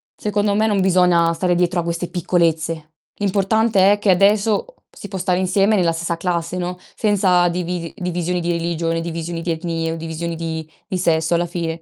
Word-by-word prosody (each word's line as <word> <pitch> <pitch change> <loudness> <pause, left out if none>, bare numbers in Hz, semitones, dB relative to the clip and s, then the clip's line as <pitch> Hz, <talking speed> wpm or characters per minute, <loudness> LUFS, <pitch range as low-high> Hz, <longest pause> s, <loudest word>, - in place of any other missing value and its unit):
secondo 205 -1 0
me, 215 +1 +2
non 205 -3 +1
bisogna 180 -3 +3
stare 175 +1 0
dietro 175 0 +1
a - - -6
queste 170 +1 -3
piccolezze. 165 -3 0 0.2
L'importante 200 0 +2
è 205 - -2
che 205 -1 +3
adesso 205 - +3 0.2
si 205 - -10
può 190 - -5
stare 180 0 +1
insieme 195 +3 +2
nella 175 -4 +2
stessa 170 +1 -2
classe, 175 0 -2
no, 180 0 -3 0.2
senza 185 -4 +3
divi 175 -1 -3
divisioni 180 -1 -2
di 175 0 -1
religione, 165 0 -1
divisioni 165 0 -4
di 170 0 -2
etnie 165 0 -2
o 165 - -3
divisioni 165 +1 -4
di 160 -1 -4 0.2
di 190 - -2
sesso 165 -2 +1
alla 175 +1 +1
fine. 165 -1 -4
175 Hz, 185 wpm, -20 LUFS, 165-190 Hz, 0.2 s, bisogna